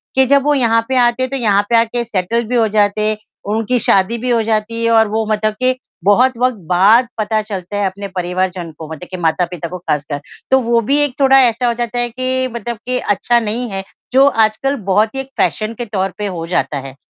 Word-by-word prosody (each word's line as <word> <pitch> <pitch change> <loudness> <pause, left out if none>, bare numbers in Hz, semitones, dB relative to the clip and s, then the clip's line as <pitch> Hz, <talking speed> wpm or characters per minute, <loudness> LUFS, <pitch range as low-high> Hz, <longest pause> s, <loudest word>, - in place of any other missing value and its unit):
कि 265 0 +5
जब 280 +1 +3
वो 295 0 +2
यहाँ 230 -4 +2
पे 260 - 0
आते 245 +1 +2
थे 270 +1 -4
यहाँ 205 -4 +2
पे 235 - +3
आके 235 +1 +1
सेटल 225 +2 -1
भी 250 - 0
हो 225 -2 +3
जाते 210 +1 +1 0.4
उनकी 225 +3 0
शादी 195 +3 +2
भी 250 +2 -3
हो 235 -2 +2
जाती 225 +1 -1
है 230 - +2
और 220 -1 +5
वो 220 +1 -1
मतलब 215 0 0
के 255 0 +3 0.3
बहुत 250 +6 +4
वक़्त 250 -2 +1
बाद 210 +7 +5
पता 215 0 0
चलता 205 -2 -6
है 205 - 0
अपने 200 +1 -6
परिवारजन 180 -1 -2
को 160 - -7
मतलब 160 +3 -8
के 185 - -4
माता-पिता 170 0 -1
को 180 - -6
ख़ासकर। 150 -4 -3 0.3
तो 265 - +6
वो 235 -1 +1
भी 280 +1 +3
एक 275 -4 -1
थोड़ा 270 0 +5
ऐसा 245 -1 +3
हो 235 - +2
जाता 240 0 -3
है 240 0 0
कि 255 +1 -1
मतलब 235 0 -4
के 250 0 0
अच्छा 235 +4 +1
नहीं 230 +2 -2
है, 195 0 -3 0.3
जो 270 +1 +6
आजकल 225 +3 +1 0.2
बहुत 215 +5 +2
ही - - -2
एक 270 - -10
फ़ैशन 215 +1 0
के 240 - -4
तौर 195 -3 -2
पे 210 - -3
हो 170 -3 -5
जाता 155 -4 -1
है। 135 - -11
225 Hz, 230 wpm, -16 LUFS, 195-245 Hz, 0.4 s, तो